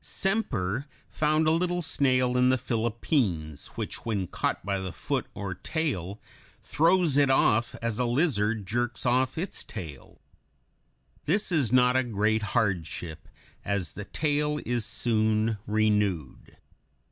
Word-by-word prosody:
Semper 135 - -1 0.2
found 155 +1 +2
a 155 - +4
little 175 +1 0
snail 130 -5 +2
in 125 0 +4
the 130 - +3
Philippines, 110 - -1
which - - -5
when 105 -5 -1
caught - - -2
by 100 -1 -1
the 95 -1 -4
foot - - -2
or 100 -2 -4
"tail" 100 - -3 0.4
throws 165 -2 +2
it 140 -2 +4
off 120 -3 +3
as 115 -1 -1
a 125 - +2
lizard 115 - +1
jerks 120 +3 -2
off 130 +3 +2
its 180 +4 -4
tail. 80 -10 -9 1.1
This 200 +5 +1
is 145 -9 +1
not 125 0 +4
a 130 - +4
great 110 -1 +1 0.2
hardship, 85 -6 -2 0.4
as 100 -3 -2
the 105 - -7
tail 150 +3 0
is 120 -2 -1
soon 110 -1 +1
renewed. 105 -8 0
120 Hz, 135 wpm, -27 LUFS, 105-145 Hz, 1.1 s, a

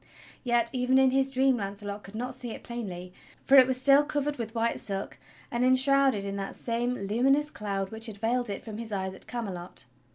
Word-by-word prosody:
Yet 240 -2 +2
even 255 0 +2
in 265 -1 +5
his 270 0 +3
dream 265 -1 +2
Launcelot 200 0 -5
could 200 - -12
not 250 +3 -4
see 250 -1 -5
it - - -8
plainly, 185 -7 -6 0.3
for 275 - +5
it 255 -1 +8
was 260 -1 0
still 275 +2 +6
covered 290 0 -2
with 230 -1 -5
white 230 0 0
silk 195 -1 -4 0.3
and 240 +1 0
enshrouded 260 -3 +4
in 200 0 -4
that 195 0 -5
same 240 +1 -2
luminous 260 +9 +1
cloud 195 -2 -4
which 225 +1 -2
had 215 -2 -8
veiled 235 +2 0
it 200 - -5
from 220 -1 -7
his 230 -1 -5
eyes 190 -2 -2
at 190 - -12
Camelot. 195 -8 -5
235 Hz, 205 wpm, -28 LUFS, 200-260 Hz, 0.3 s, it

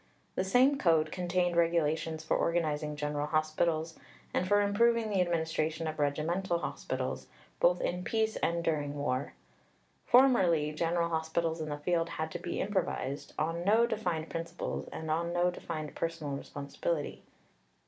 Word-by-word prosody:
The - - 0
same 255 +8 +4
code 160 -3 +3
contained 175 -1 0
regulations 160 -1 +1
for 160 - +1
organizing 155 -3 0
General 150 0 -2
Hospitals, 155 +1 0 0.3
and 185 - +1
for 205 +1 +4
improving 225 +2 +2
the 195 -2 +3
administration 160 -2 0
of 155 -1 -4
Regimental 165 +5 0
Hospitals, 135 -4 -4 0.3
both 175 +1 +4
in 180 +1 -1
peace 220 +4 0
and 170 0 0
during 145 -3 -1
war. 140 -1 -2 0.7
Formerly, 185 - +5
general 170 +2 0
hospitals 160 0 -1
in 155 - -3
the 145 - -3
field 165 +2 0
had 160 0 -3
to 175 - -4
be - - -4
improvised, 175 -8 -2
on 165 +2 -1
no 220 +5 +5
defined 175 -9 -2
principles 165 +1 -4
and 160 -1 -5
on 170 +2 0
no 175 0 +2
defined 155 -4 -5
personal 165 -4 -3
responsibility. 145 - -4
165 Hz, 145 wpm, -31 LUFS, 155-180 Hz, 0.7 s, Formerly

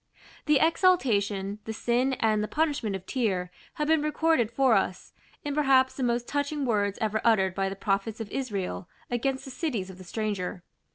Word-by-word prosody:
The 300 -1 +5
exaltation, 215 - +2
the 220 - -4
sin, 245 +4 +1
and 215 -4 +1
the - - -2
punishment 290 -10 0
of 190 -1 -7
Tyre 190 -8 -1 0.2
have 300 - -1
been 320 -1 +3
recorded 300 -5 +2
for 255 +1 +3
us, 190 -3 -1 0.3
in 290 - -1
perhaps 270 -3 +4
the - - -6
most 240 -1 0
touching 285 0 -1
words 205 -4 0
ever 215 -1 0
uttered 190 -5 +3
by 195 0 -1
the 195 - -5
Prophets 200 +3 -1
of 220 -2 -6
Israel 200 - -3 0.2
against 265 +2 -1
the 265 - -8
cities 245 - -3
of 185 - -14
the - - -9
stranger. 195 -2 -3
230 Hz, 180 wpm, -27 LUFS, 200-275 Hz, 0.3 s, The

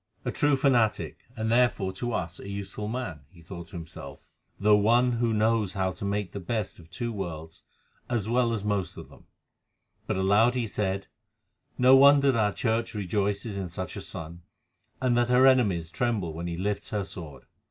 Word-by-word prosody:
"A - - 0
true 145 -1 +2
fanatic, 125 -5 +1 0.2
and 110 -1 -2
therefore 115 -6 +2
to 120 +5 -3
us 90 -4 -3
a 100 - -8
useful 100 +1 -5
man," 110 -9 -4
he 85 -1 -18
thought 85 0 -9
to - - -13
himself, 80 -1 -9 0.3
"though 105 +1 +5
one 120 +4 +4
who 120 -1 0
knows 110 -2 +1
how 95 -2 0
to 95 - -9
make 100 -2 -2
the 100 - -5
best 105 +1 -3
of 85 -1 -16
two 115 +6 -4
worlds 80 -4 -6 0.5
as 115 -4 -1
well 120 0 +2
as 110 -3 -2
most 100 -5 -2
of - - -10
them;" - - -18 0.8
but - - -1
aloud 105 +6 +4
he 125 -2 0
said, 100 -2 -2 0.7
"No 130 +1 +7
wonder 140 0 +7
that 115 -4 +2
our 105 - +2
Church 115 0 -1
rejoices 100 +1 -1
in 95 -2 -3
such 90 -1 -6
a - - -5
son, 85 +2 -8 0.6
and 125 -2 +2
that 120 0 +2
her 125 +1 +5
enemies 100 -11 +3
tremble 105 -9 -1
when 85 +2 -5
he 85 -1 -4
lifts 100 +2 -2
her 105 -2 -1
sword. 80 -7 -9
105 Hz, 190 wpm, -27 LUFS, 95-120 Hz, 0.8 s, No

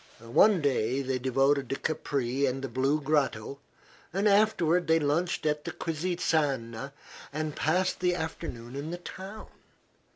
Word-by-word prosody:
One 205 -4 +6
day 135 -2 +1
they 130 -1 -1
devoted 135 +1 +2
to - - 0
Capri 135 -3 -1
and 135 +1 -2
the - - -1
Blue 135 +5 +1
Grotto, 140 -4 0 0.5
and 195 +4 +1
afterward 190 -5 +3
they 160 0 +5
lunched 160 +4 0
at 150 -1 0
the - - -4
Quisisana 150 -7 -1 0.4
and 155 0 -3
passed 180 +4 +1
the 180 -1 +2
afternoon 150 -7 -5
in 145 +3 -4
the 175 - -4
town. 190 +4 -9
150 Hz, 140 wpm, -29 LUFS, 135-175 Hz, 0.5 s, One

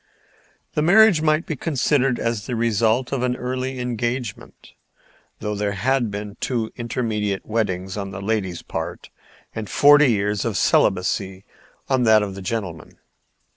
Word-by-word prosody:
The 150 - 0
marriage 190 +1 +6
might 155 +1 +2
be 155 - -3
considered 135 -3 +1
as 115 -3 -2
the 125 - -2
result 115 +2 +1
of 135 -3 -1
an 125 0 0
early 130 +1 -3
engagement, 120 -2 -4 0.7
though 105 0 -3
there 100 0 -2
had 120 +4 0
been 100 0 -6
two 115 -4 -2
intermediate 115 -5 -2
weddings 95 -4 -2
on 100 -1 -4
the 100 +1 -7
lady's 100 -4 -2
part - - -6 0.4
and 110 -2 -5
forty 145 0 +6
years 105 -1 0
of 115 -5 -2
celibacy 95 +1 +1 0.4
on 130 -2 +1
that 110 -3 +5
of 100 -2 -4
the 100 - -8
gentleman. 95 -6 -5
115 Hz, 145 wpm, -22 LUFS, 100-130 Hz, 0.7 s, marriage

